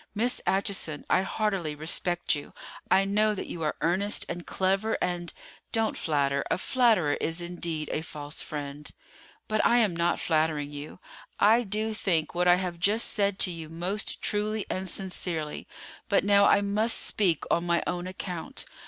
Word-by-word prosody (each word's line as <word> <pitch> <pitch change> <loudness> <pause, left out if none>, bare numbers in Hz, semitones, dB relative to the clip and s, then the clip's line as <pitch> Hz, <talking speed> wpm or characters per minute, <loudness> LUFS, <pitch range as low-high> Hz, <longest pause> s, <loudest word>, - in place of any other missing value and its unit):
Miss 240 +4 +1
Acheson, 190 -6 0
I 185 - +5
heartily 195 -6 -1
respect 175 +3 +1
you. 145 -2 -5 0.4
I 195 +1 +4
know 210 +2 +2
that - - -4
you 170 - -7
are 155 -1 -1
earnest 195 +5 +2
and 175 0 -6
clever, 195 +4 0
and——" 175 -2 -2 0.4
"Don't 225 -1 0
flatter; 140 -3 0
a - - +1
flatterer 215 - +3
is 165 +2 0
indeed 170 -3 -3
a 155 - -1
false 150 -1 -6
friend." 145 -1 -5 0.6
"But 215 0 +1
I 240 - +4
am 210 -7 +3
not 170 +1 +1
flattering 155 -2 0
you. 145 +1 -7 0.4
I 220 +4 +5
do 215 0 -1
think 175 -7 0
what 175 +1 +1
I 175 - +7
have 180 -2 -3
just 210 +5 +2
said 200 -2 +1
to 185 - +3
you 165 -2 -7
most 180 +6 -3
truly 210 0 +1
and 185 0 -3
sincerely; 170 -5 -3 0.4
but 200 - +3
now 200 0 +6
I 200 - +5
must 210 +3 +1
speak 180 -7 +1
on 170 +1 +1
my 170 0 +2
own 180 0 -3
account. 180 -2 -5
180 Hz, 170 wpm, -28 LUFS, 160-205 Hz, 0.6 s, I